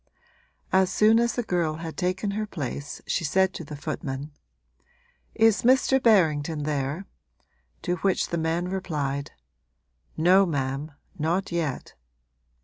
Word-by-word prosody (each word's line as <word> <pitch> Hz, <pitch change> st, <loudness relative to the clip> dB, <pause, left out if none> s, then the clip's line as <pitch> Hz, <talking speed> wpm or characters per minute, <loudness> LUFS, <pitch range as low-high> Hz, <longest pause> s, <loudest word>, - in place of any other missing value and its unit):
As 190 Hz, -1 st, +4 dB
soon 220 Hz, +2 st, +5 dB
as 235 Hz, 0 st, +1 dB
the 245 Hz, -, -2 dB
girl 170 Hz, -7 st, 0 dB
had 165 Hz, 0 st, -6 dB
taken 185 Hz, +2 st, -1 dB
her 215 Hz, +1 st, -2 dB
place 145 Hz, -4 st, -5 dB
she 175 Hz, -, -1 dB
said 190 Hz, +4 st, +2 dB
to -, -, -6 dB
the 150 Hz, 0 st, -8 dB
footman: 145 Hz, 0 st, -5 dB, 1.0 s
'Is 225 Hz, -2 st, +4 dB
Mr. 265 Hz, +2 st, +4 dB
Berrington 160 Hz, -, +3 dB
there?' 145 Hz, +4 st, -2 dB, 0.8 s
to 180 Hz, -2 st, -1 dB
which 190 Hz, +2 st, 0 dB
the 170 Hz, -, -1 dB
man 165 Hz, +2 st, -1 dB
replied: 150 Hz, -7 st, -3 dB, 0.9 s
'No 185 Hz, +4 st, +5 dB
ma'am, 140 Hz, 0 st, -2 dB, 0.3 s
not 175 Hz, +6 st, 0 dB
yet.' 160 Hz, -6 st, -3 dB
170 Hz, 130 wpm, -26 LUFS, 150-195 Hz, 1.0 s, soon